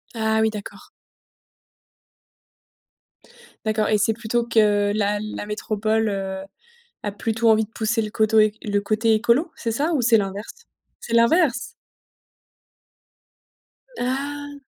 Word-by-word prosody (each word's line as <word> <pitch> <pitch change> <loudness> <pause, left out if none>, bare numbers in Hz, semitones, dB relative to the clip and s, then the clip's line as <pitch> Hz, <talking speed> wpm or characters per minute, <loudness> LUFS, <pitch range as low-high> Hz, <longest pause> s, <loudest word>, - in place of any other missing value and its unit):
Ah 220 0 +1
oui, 220 - +3
d'accord. 210 -2 -9 2.8
D'accord 215 0 +1
et 215 - +3
c'est 210 +2 +2
plutôt 235 +1 -1
que 205 -3 +3
la 205 0 0
la 215 0 -5
métropole, 215 +1 -1
heu, 190 -1 -4 0.6
a 205 - -1
plutôt 225 +2 0
envie 220 0 +4
de 215 - -18
pousser 225 +1 -1
le 215 - -4
côté 220 0 +2
é 215 -1 +5
le 205 -1 0
côté 220 +2 +1
écolo, 240 +9 +2
c'est 230 - -3
ça 295 +9 0
ou 275 - +1
c'est 230 -1 +5
l'inverse? 205 - -5 0.3
C'est 235 - -5
l'inverse? 245 +1 +3 2.3
Ah! 285 +3 -3
220 Hz, 125 wpm, -22 LUFS, 210-235 Hz, 2.8 s, é